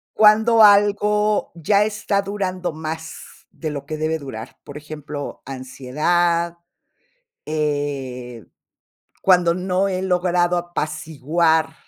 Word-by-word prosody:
Cuando 220 Hz, +1 st, +6 dB
algo 210 Hz, +1 st, +4 dB
ya 200 Hz, +5 st, +2 dB
está 210 Hz, -1 st, -1 dB
durando 190 Hz, -3 st, -3 dB
más 160 Hz, +1 st, -8 dB
de 155 Hz, -, -5 dB
lo 140 Hz, -2 st, -6 dB
que 155 Hz, 0 st, -5 dB
debe 155 Hz, +1 st, -1 dB
durar. 135 Hz, -7 st, -9 dB
Por 145 Hz, +1 st, -9 dB
ejemplo, 150 Hz, -1 st, -7 dB
ansiedad, 155 Hz, +7 st, -1 dB, 0.9 s
eh, 140 Hz, -6 st, -3 dB, 0.8 s
cuando 180 Hz, -3 st, +4 dB
no 185 Hz, +2 st, 0 dB
he 185 Hz, -1 st, -2 dB
logrado 180 Hz, -1 st, +1 dB
apaciguar 160 Hz, -1 st, 0 dB
170 Hz, 100 wpm, -21 LUFS, 150-190 Hz, 0.9 s, Cuando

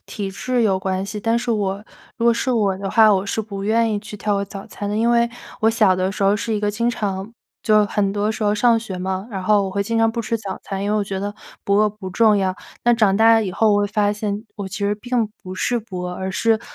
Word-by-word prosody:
体 200 Hz, -2 st, -5 dB
质 250 Hz, +5 st, -1 dB
有 195 Hz, -4 st, +2 dB
关 190 Hz, 0 st, -2 dB
系。 205 Hz, +2 st, -5 dB
但 225 Hz, +3 st, +1 dB
是 240 Hz, -, -3 dB
我 200 Hz, -2 st, -1 dB, 0.4 s
如 230 Hz, -, -1 dB
果 235 Hz, -, +5 dB
是 255 Hz, +2 st, 0 dB
我 205 Hz, -5 st, +1 dB
的 195 Hz, 0 st, -4 dB
话， 220 Hz, -2 st, +6 dB
我 190 Hz, 0 st, 0 dB
是 200 Hz, -, -2 dB
不 200 Hz, -2 st, -6 dB
愿 225 Hz, +2 st, +2 dB
意 210 Hz, -, 0 dB
去 210 Hz, -, -10 dB
跳 210 Hz, 0 st, -1 dB
过 200 Hz, 0 st, 0 dB
早 195 Hz, 0 st, -9 dB
餐 205 Hz, -, -6 dB
的。 205 Hz, -, -2 dB
因 225 Hz, +2 st, +2 dB
为 235 Hz, 0 st, +3 dB, 0.3 s
我 220 Hz, -, +4 dB
小 215 Hz, -5 st, +3 dB
的 185 Hz, +1 st, 0 dB
时 200 Hz, -, -4 dB
候 200 Hz, +2 st, +4 dB
是 225 Hz, 0 st, -2 dB
一 210 Hz, -, -1 dB
个 210 Hz, -, +1 dB
经 235 Hz, +3 st, 0 dB
常 200 Hz, -2 st, -4 dB, 0.3 s
就 215 Hz, -1 st, +4 dB
很 200 Hz, -1 st, 0 dB
多 210 Hz, +1 st, 0 dB
时 220 Hz, 0 st, -3 dB
候 205 Hz, 0 st, +2 dB
上 230 Hz, +2 st, +4 dB
学 200 Hz, -5 st, -6 dB
嘛， 190 Hz, +2 st, -3 dB
然 195 Hz, -3 st, -4 dB
后 205 Hz, +1 st, +3 dB
我 195 Hz, -, -3 dB
会 200 Hz, +1 st, -1 dB
经 230 Hz, +3 st, -2 dB
常 225 Hz, 0 st, +3 dB
不 235 Hz, -, -2 dB
吃 230 Hz, 0 st, -1 dB
早 200 Hz, -4 st, -6 dB
餐， 195 Hz, 0 st, -4 dB
因 205 Hz, -, 0 dB
为 215 Hz, -, +2 dB
我 -, -, +1 dB
觉 195 Hz, -1 st, -4 dB
得 205 Hz, +1 st, -4 dB, 0.3 s
不 200 Hz, -, 0 dB
饿 210 Hz, +1 st, +4 dB
不 205 Hz, -3 st, -8 dB
重 215 Hz, +2 st, +4 dB
要。 190 Hz, -1 st, 0 dB, 0.3 s
但 240 Hz, 0 st, +4 dB
长 210 Hz, -4 st, +3 dB
大 225 Hz, +2 st, +6 dB
了 225 Hz, -, +2 dB
以 -, -, -2 dB
后， 215 Hz, +3 st, +2 dB
我 205 Hz, -, +3 dB
会 205 Hz, -, +1 dB
发 205 Hz, -1 st, +1 dB
现 210 Hz, 0 st, -3 dB
我 200 Hz, -3 st, -5 dB
其 -, -, -8 dB
实 200 Hz, +1 st, +1 dB
并 240 Hz, +1 st, -1 dB, 0.2 s
不 185 Hz, -1 st, -7 dB
是 240 Hz, +5 st, 0 dB
不 205 Hz, -5 st, -7 dB
饿， 180 Hz, 0 st, -4 dB
而 190 Hz, +1 st, -4 dB
是， 225 Hz, +3 st, +1 dB
205 Hz, 305 characters per minute, -21 LUFS, 195-225 Hz, 0.4 s, 话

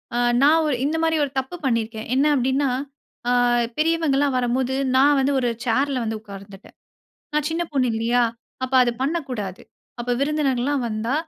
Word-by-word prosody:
ஆ -, -, 0 dB, 0.2 s
நான் 315 Hz, +3 st, +5 dB
ஒ -, -, +1 dB, 0.2 s
இந்த 315 Hz, +2 st, 0 dB
மாரி 320 Hz, 0 st, +2 dB
ஒரு 270 Hz, -, -9 dB
தப்பு 265 Hz, +7 st, -6 dB
பண்ணியிருக்கேன். 225 Hz, -2 st, -1 dB
என்ன 275 Hz, +3 st, +3 dB
அப்டின்னா 265 Hz, +2 st, +1 dB, 0.6 s
ஆ -, -, +3 dB, 0.5 s
பெரியவங்கல்லாம் 305 Hz, -4 st, +1 dB
வரம்போது 250 Hz, +1 st, 0 dB, 0.2 s
நான் 285 Hz, +2 st, +5 dB
வந்து 270 Hz, +1 st, +1 dB
ஒரு 245 Hz, -1 st, 0 dB, 0.2 s
சேர்ல 270 Hz, +3 st, +1 dB
வந்து 220 Hz, -1 st, -3 dB
உக்கார்ந்துட்டேன். 200 Hz, -1 st, -12 dB, 0.6 s
நான் 300 Hz, -1 st, 0 dB
சின்ன 335 Hz, +2 st, -1 dB
பொண்ணுல்லையா? 240 Hz, -2 st, +1 dB, 0.4 s
அப்ப 260 Hz, +1 st, -4 dB
அத 240 Hz, -, +2 dB
பண்ணக்கூடாது. 255 Hz, -, -3 dB, 0.4 s
அப்ப 245 Hz, +1 st, -3 dB
விருந்தினர்கள்லாம் 280 Hz, -3 st, 0 dB
வந்தா 220 Hz, +4 st, -2 dB
265 Hz, 150 wpm, -22 LUFS, 235-290 Hz, 0.6 s, நான்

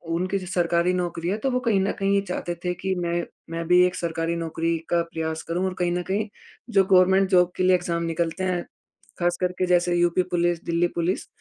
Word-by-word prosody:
उनकी 185 Hz, +3 st, -1 dB
जो 185 Hz, -, -8 dB
सरकारी 175 Hz, 0 st, +1 dB
नौकरी 175 Hz, -1 st, -2 dB
है, 200 Hz, -, 0 dB
तो 265 Hz, +5 st, -1 dB
वो 250 Hz, -, +1 dB
कहीं 230 Hz, -5 st, +1 dB
न 195 Hz, -, +1 dB
कहीं 195 Hz, 0 st, +1 dB
ये 200 Hz, -, +3 dB
चाहते 175 Hz, -1 st, -3 dB
थे 180 Hz, -, +1 dB
कि 190 Hz, +2 st, -2 dB
मैं 170 Hz, 0 st, -1 dB, 0.3 s
मैं 165 Hz, 0 st, -4 dB
भी 180 Hz, +1 st, +6 dB
एक 180 Hz, 0 st, -1 dB
सरकारी 165 Hz, 0 st, -2 dB
नौकरी 165 Hz, 0 st, -1 dB
का 170 Hz, -1 st, +3 dB
प्रयास 160 Hz, 0 st, -3 dB
करूँ 175 Hz, +3 st, -2 dB
और 190 Hz, -, -1 dB
कहीं 175 Hz, -, +1 dB
न 175 Hz, 0 st, -1 dB
कहीं 205 Hz, +4 st, -2 dB, 0.4 s
जो 200 Hz, -4 st, +4 dB
गवर्नमेंट 190 Hz, +1 st, +5 dB
जॉब 180 Hz, -2 st, +4 dB
के -, -, +1 dB
लिए 185 Hz, 0 st, +5 dB
एग्ज़ाम 170 Hz, -1 st, -2 dB
निकलते 165 Hz, +2 st, -2 dB
हैं, 180 Hz, -2 st, 0 dB, 0.6 s
ख़ास 175 Hz, 0 st, +1 dB
करके 180 Hz, 0 st, 0 dB
जैसे 175 Hz, 0 st, +2 dB
यूपी 175 Hz, +1 st, +2 dB
पुलिस, 175 Hz, -1 st, +1 dB
दिल्ली 170 Hz, +1 st, +1 dB
पुलिस, 175 Hz, +3 st, -1 dB
175 Hz, 220 wpm, -24 LUFS, 170-185 Hz, 0.6 s, भी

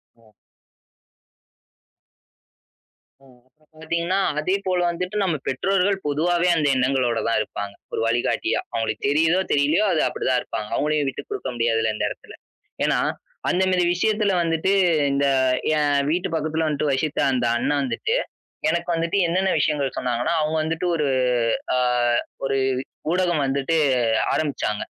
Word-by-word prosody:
ஓ. 110 Hz, -2 st, -25 dB, 2.9 s
ம். 125 Hz, -2 st, -20 dB
இப்ப 155 Hz, +4 st, -34 dB, 0.2 s
பார்த்தீங்கன்னா 170 Hz, +4 st, -1 dB, 0.2 s
அதே 185 Hz, +5 st, 0 dB
போல 180 Hz, -1 st, +1 dB
வந்துட்டு 180 Hz, +4 st, -4 dB
நம்ம 170 Hz, -5 st, 0 dB
பெற்றோர்கள் 195 Hz, +6 st, +1 dB
பொதுவாவே 170 Hz, +4 st, +1 dB
அந்த 150 Hz, -3 st, +1 dB
எண்ணங்களோடதான் 125 Hz, -3 st, +1 dB
இருப்பாங்க. 100 Hz, -1 st, -5 dB, 0.2 s
ஒரு -, -, -1 dB
வழிகாட்டியா. 120 Hz, +1 st, 0 dB
அவங்களுக்கு 115 Hz, -1 st, -2 dB
தெரியுதோ 160 Hz, +5 st, +3 dB
தெரியலியோ 150 Hz, +8 st, +3 dB
அது 155 Hz, -, +2 dB
அப்படிதான் 130 Hz, -1 st, 0 dB
இருப்பாங்க. 105 Hz, -1 st, -5 dB
அவங்களையும் 150 Hz, -1 st, 0 dB
விட்டுக்குடுக்க 130 Hz, -, -6 dB
முடியாதுல்ல 115 Hz, -2 st, +1 dB
இந்த -, -, -1 dB
இடத்துல. -, -, -10 dB, 0.5 s
ஏன்னா -, -, +2 dB, 0.5 s
அந்த 185 Hz, +1 st, +2 dB
மாரி 180 Hz, -1 st, +2 dB
விஷயத்துல 210 Hz, +2 st, +1 dB
வந்துட்டு 165 Hz, +3 st, 0 dB, 0.4 s
இந்த 140 Hz, +1 st, +1 dB, 0.5 s
என் 145 Hz, -1 st, +2 dB
வீட்டு 175 Hz, +2 st, 0 dB
பக்கத்துல 160 Hz, +1 st, -1 dB
வந்துட்டு 150 Hz, -1 st, 0 dB
வசித்த 145 Hz, +3 st, -1 dB
அந்த 125 Hz, -2 st, 0 dB
அண்ணா 145 Hz, -, 0 dB
வந்துட்டு, 440 Hz, -, -1 dB, 0.5 s
எனக்கு 170 Hz, +1 st, -1 dB
வந்துட்டு 165 Hz, +4 st, -1 dB
என்னென்ன 190 Hz, +3 st, +1 dB
விஷயங்கள் 145 Hz, -3 st, 0 dB
சொன்னாங்கன்னா 125 Hz, +4 st, -1 dB
அவங்க 155 Hz, +1 st, -1 dB
வந்துட்டு 165 Hz, +2 st, -2 dB
ஒரு 150 Hz, -3 st, 0 dB, 0.7 s
அ -, -, +2 dB, 0.7 s
ஒரு 135 Hz, 0 st, 0 dB, 0.6 s
ஊடகம் 175 Hz, -4 st, +1 dB
வந்துட்டு 140 Hz, +4 st, 0 dB, 0.6 s
ஆரம்பிச்சாங்க. 140 Hz, -8 st, -1 dB
150 Hz, 125 wpm, -23 LUFS, 130-175 Hz, 2.9 s, தெரியுதோ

